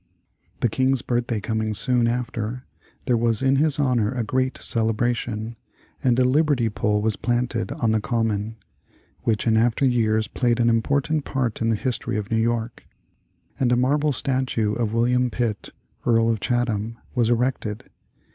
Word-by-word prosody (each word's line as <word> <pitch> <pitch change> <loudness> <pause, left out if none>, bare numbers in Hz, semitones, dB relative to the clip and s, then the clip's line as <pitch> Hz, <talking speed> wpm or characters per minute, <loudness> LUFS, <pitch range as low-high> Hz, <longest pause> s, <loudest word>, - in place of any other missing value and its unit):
The - - +4
King's 130 +2 +1
birthday 120 -2 -1
coming 110 0 -2
soon 120 +1 +2
after, 120 0 -3 0.4
there 125 - +2
was 115 0 +1
in 135 +1 +3
his 150 0 +2
honor 125 -7 +1
a 125 -2 -2
great 130 +3 -1
celebration, 115 0 -1 0.5
and 125 -2 +3
a 130 - +4
liberty 135 -3 +2
pole 105 0 0
was 110 -1 +1
planted 120 -1 -1
on 115 -2 0
the 110 -1 +1
Common, 110 -2 -1 0.7
which 110 -2 +1
in 115 -2 +3
after 115 +4 +2
years 110 -4 +2
played 120 +1 0
an 120 0 +4
important 140 +6 +1
part 125 -6 -2
in 115 - +1
the 115 - +2
history 120 0 -2
of 105 0 -5
New 110 0 +2
York; 115 0 -2 0.7
and 125 -3 +2
a 125 - +3
marble 145 +4 +2
statue 130 -5 0
of 115 -2 -1
William 125 +2 +2
Pitt, 115 -4 -2 0.3
Earl 115 -1 +3
of 110 - -1
Chatham, 115 -2 -1 0.2
was 120 -3 +1
erected. 120 -3 -1
120 Hz, 160 wpm, -23 LUFS, 110-125 Hz, 0.7 s, The